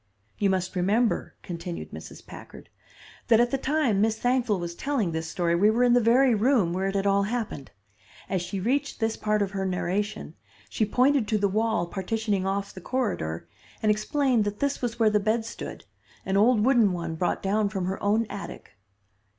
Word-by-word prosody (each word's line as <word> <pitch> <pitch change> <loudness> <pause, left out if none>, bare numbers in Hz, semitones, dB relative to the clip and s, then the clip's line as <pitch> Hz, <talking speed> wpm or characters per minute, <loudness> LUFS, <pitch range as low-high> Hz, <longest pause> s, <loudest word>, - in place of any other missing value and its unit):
"You 200 - +2
must 185 0 -1
remember," 210 +6 +1
continued 170 -1 -6
Mrs. - - -10
Packard, - - -12 0.6
"that 230 -2 +5
at 240 0 +3
the 275 - +1
time 265 -8 +1
Miss 220 0 +1
Thankful 245 -4 +1
was 170 0 -4
telling 230 -3 -1
this 160 0 -4
story 170 -2 0
we 195 +5 +4
were 235 +3 +2
in 245 -1 +4
the 245 - +5
very 245 +3 +4
room 220 -5 +2
where 190 +2 -1
it 195 - -3
had 195 0 0
all 200 0 +3
happened. 210 - -3 0.6
As 190 -2 -1
she 185 +3 -4
reached 255 +8 -1
this 225 -1 0
part 210 -1 0
of 195 - -4
her 195 -1 -3
narration, 190 +3 -2 0.4
she 215 - 0
pointed 255 +1 +2
to 215 - +1
the 200 -1 +2
wall 215 -2 0
partitioning 200 +1 -2
off 200 +1 -2
the 185 - -10
corridor, 180 - -2 0.4
and 215 - +4
explained 245 +2 +1
that 205 0 -4
this 280 0 -1
was 240 -2 -2
where 225 -2 +3
the 210 - +3
bed 220 +2 0
stood, 230 - -8 0.4
an 190 - -1
old 215 +1 +4
wooden 235 -7 +4
one 170 -2 -4
brought 175 +2 -1
down 205 +1 +1
from 190 -3 -3
her 190 +1 -3
own 215 +3 +2
attic. 200 - -8
210 Hz, 195 wpm, -26 LUFS, 190-235 Hz, 0.6 s, that